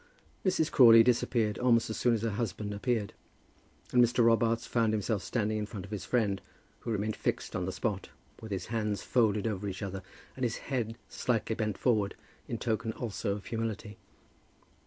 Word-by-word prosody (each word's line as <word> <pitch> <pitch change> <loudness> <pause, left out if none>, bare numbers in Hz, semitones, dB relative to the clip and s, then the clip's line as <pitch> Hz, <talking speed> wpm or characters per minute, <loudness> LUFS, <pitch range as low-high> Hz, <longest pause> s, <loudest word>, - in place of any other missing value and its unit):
Mrs. 180 -5 +1
Crawley 115 -3 +8
disappeared 115 -3 +1
almost 120 -2 +3
as - - -3
soon 120 -1 +2
as 110 - -3
her 115 - 0
husband 105 -1 -3
appeared, 105 -1 -1 0.8
and 125 -1 +6
Mr. 120 0 +3
Robarts 115 0 +3
found 115 -2 +1
himself 105 -1 0
standing 110 -1 -1
in 105 - -3
front 100 -4 -7
of 100 - -13
his 105 - -4
friend, 105 -6 +1 0.4
who - - -7
remained 105 -1 -1
fixed - - -2
on 90 - -1
the 95 - -2
spot, 100 -2 -3 0.3
with 110 -1 -8
his 95 - -2
hands 105 -2 -1
folded 110 -4 +2
over 105 -2 -2
each 95 +1 -5
other 95 -1 -4 0.3
and 130 - -5
his 115 -2 0
neck 115 -4 -1
slightly 115 -2 -1
bent 110 -4 -2
forward, 105 -5 +1 0.3
in 115 - -3
token 110 0 -1
also 105 -4 -3
of 100 -1 -7
humility. 110 -2 -4
110 Hz, 180 wpm, -30 LUFS, 105-115 Hz, 0.8 s, Crawley